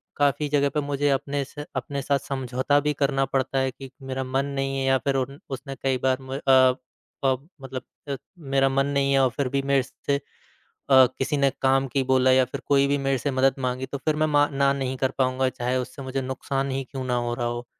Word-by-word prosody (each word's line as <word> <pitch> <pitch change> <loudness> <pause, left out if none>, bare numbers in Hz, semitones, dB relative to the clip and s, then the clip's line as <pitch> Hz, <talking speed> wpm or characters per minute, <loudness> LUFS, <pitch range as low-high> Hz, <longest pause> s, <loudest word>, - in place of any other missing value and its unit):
काफ़ी 145 +1 +1
जगह 140 -1 +2
पर - - +2
मुझे 145 0 0
अपने 140 +1 0
स 145 +2 -9
अपने 140 -2 -3
साथ 140 +1 +1
समझौता 130 +1 +1
भी 150 +1 0
करना 135 -1 +1
पड़ता 135 0 0
है 130 0 0
कि 135 +1 -11
मेरा 130 0 -3
मन 135 +1 -1
नहीं 135 0 -1
है 135 - -1
या 135 0 +4
फिर 135 +1 -1
उन 135 +2 -2
उसने 135 +1 -6
कई 135 -1 +2
बार 130 -1 +3
म 130 0 -6
अ, - - -5 0.9
प 135 +2 +1
मतलब 135 -1 -6 0.3
अ, 140 - -1 0.2
मेरा 135 -3 +2
मन 135 +1 +1
नहीं 140 -1 +1
है 135 - +4
और 130 -1 +4
फिर 140 - +1
भी 140 +1 0
मेरे 135 -1 +2
से 140 +3 -3
अ, - - -8 0.7
किसी 130 +2 +4
ने 140 -1 +3
काम 135 0 +3
की 135 - +2
बोला 130 0 +4
या 130 0 +5
फिर 130 +2 -7
कोई 140 -1 +4
भी 140 +1 +1
मेरे 135 -1 0
से 145 - -1
मदद 130 0 +3
माँगी 130 0 -2
तो 140 +2 -5
फ़िर 155 +2 0
मैं 155 0 +2
मा 145 -1 +4
ना 140 0 +3
नहीं 130 -1 -2
कर 130 0 0
पाऊँगा 130 0 +2
चाहे 125 0 -2
उससे 130 +2 -4
मुझे 135 0 -3
नुकसान 135 +1 -2
ही 135 +1 -1
क्यों 130 -1 -5
ना 125 -1 -1
हो 120 0 -1
रहा 120 0 -2
हो। 120 0 -3
135 Hz, 235 wpm, -25 LUFS, 130-140 Hz, 0.9 s, या